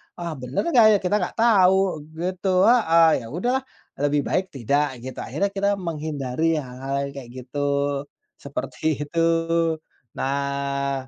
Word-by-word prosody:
"Ah, 170 -1 -5
bener 125 +2 -2
enggak 240 -9 +6
ya?" - - +4
Kita 185 +3 +1
enggak 180 - -3
tahu 190 -6 +4 0.2
gitu, 185 +2 0
heeh. 165 - +5
Ya - - -9
udahlah 245 - -1 0.4
lebih 145 0 +1
baik 190 0 0
tidak 140 +2 0
gitu, 130 -1 -7
akhirnya 155 - -1
kita 200 0 0
menghindari 155 -2 -2
hal-hal 135 +1 -4
yang - - -8
kayak 125 -4 -8
gitu, 140 +3 -6 0.8
seperti 145 +1 -3
itu. 165 +2 -3 1.0
Nah, 140 -1 -2
155 Hz, 135 wpm, -23 LUFS, 140-185 Hz, 1.0 s, enggak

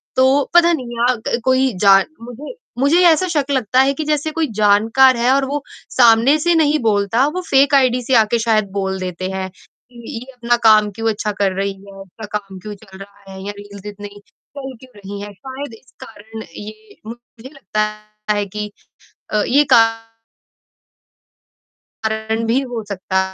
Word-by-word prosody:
तो 265 +2 +4
पता 345 0 +6
नहीं 240 -5 -5
आग 235 -3 -2
कोई 260 0 +2
जान 195 -1 +6 0.2
मुझे 245 - -9 0.3
मुझे 285 +5 +3
ये 360 - +5
ऐसा 335 +3 +3
शक 300 -6 0
लगता 255 -1 +1
है 275 +1 +2
कि 310 - -4
जैसे 305 +1 -1
कोई 320 0 -1
जानकार 225 +5 +4
है 245 +2 +2
और 275 0 +2
वो 285 +1 -3 0.3
सामने 240 +4 +5
से 345 +3 +2
नहीं 305 -2 +3
बोलता, 220 +2 +1
वो 360 +5 -3
फेक 275 +1 +4
आईडी 255 -2 +3
से 265 - -2
आके 225 +1 +3
शायद 220 -3 +1
बोल 190 -1 -3
देते 185 0 -4
हैं। 190 0 -4 0.4
कि 235 +1 -8
ये 255 +3 -12
अपना 240 -1 0
काम 215 -1 +5
क्यों 225 +3 -2
अच्छा 210 0 -2
कर 195 -1 +2
रही 195 0 -1
है, 195 0 -15
उसका 195 +3 -11
काम 195 -2 -12
क्यों 210 +2 -8
चल 195 -2 -16
रहा 200 0 -14
है 190 - -9
या 205 - -3
रील्स 205 -1 -12
इतनी 205 0 -8 0.5
चल 265 -1 -6
क्यों 260 -1 -16
रही 200 0 -8
है? 205 0 -7
शायद 265 +3 -8
इस 250 +3 -17
कारण 220 -2 -11
ये 215 0 -11
मुझे 240 +1 -12
लगता 270 -7 -3 0.5
है 205 -1 -1
कि 210 +1 -6 0.6
अ, 210 -1 +1
ये 285 +4 +4
का 230 -2 +8 2.2
कारण 220 +1 -2
भी 235 +4 +2
हो 235 -2 -4
सकता 190 -1 -2
225 Hz, 180 wpm, -18 LUFS, 205-265 Hz, 2.2 s, का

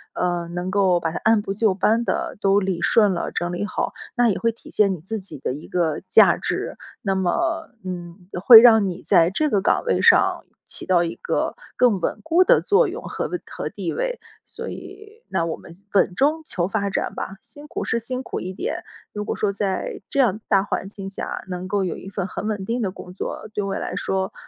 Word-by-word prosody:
呃， 175 -1 -1
能 175 +2 -4
够 190 -3 +3
把 165 -1 -2
它 - - -4
按 220 0 +5
部 200 -1 -3
就 210 -1 +2
班 220 +4 +2
地 - - -2
都 195 +1 +4
理 190 -3 -2
顺 210 -1 +4
了、 175 - -3
整 175 0 -2
理 175 +3 -2
好， 210 - -2 0.2
那 245 -1 +4
也 205 - +1
会 230 - +2
体 230 - -15
现 205 -2 +3
你 - - -10
自 215 +6 -4
己 190 -5 -10
的 125 - -3
一 150 +4 -9
个 165 -4 0
价 - - +7
值， - - -3 0.2
那 195 - +1
么 325 - 0
嗯， 180 0 -7 0.2
会 230 -1 +12
让 220 -4 +6
你 175 - -7
在 165 0 +4
这 300 +9 0
个 200 -2 +2
岗 - - +2
位 485 - +1
上 - - +4 0.2
起 - - -6
到 180 -2 +4
一 170 - -3
个 - - -2 0.2
更 230 -7 +4
稳 - - -2
固 335 +3 +4
的 - - +5
作 425 +2 +3
用 390 +6 -6
和 - - -3
位 - - -4
和 - - -5
地 - - -4
位。 - - -2 0.3
所 - - -7
以 420 +3 -10
那 165 - 0
我 165 - -3
们 170 - -14 0.2
稳 190 -2 +3
中 300 - +2
求 175 - -2
发 200 0 -1
展 200 - -2
吧， 195 - -5
辛 295 +1 -13
苦 - - -4
是 230 - 0
辛 255 +3 -5
苦 - - -4
一 185 - -5
点， 395 - -4 0.3
如 210 0 -4
果 - - -2
说 210 - 0
在 195 -2 -2
这 280 - -1
样 220 -6 +3
大 195 -2 +3
环 195 -1 -3
境 195 -1 -8
下 195 - -5
能 180 0 -4
够 200 0 0
有 180 - -2
一 195 - -9
份 195 -2 -3
很 210 - -5
稳 205 -3 -2
定 235 +3 -1
的 200 - 0
工 180 -1 -10
作， 185 - -5
对 205 - -1
我 195 0 -2
来 - - -4
说 190 0 -2
200 Hz, 245 characters per minute, -22 LUFS, 185-235 Hz, 0.3 s, 会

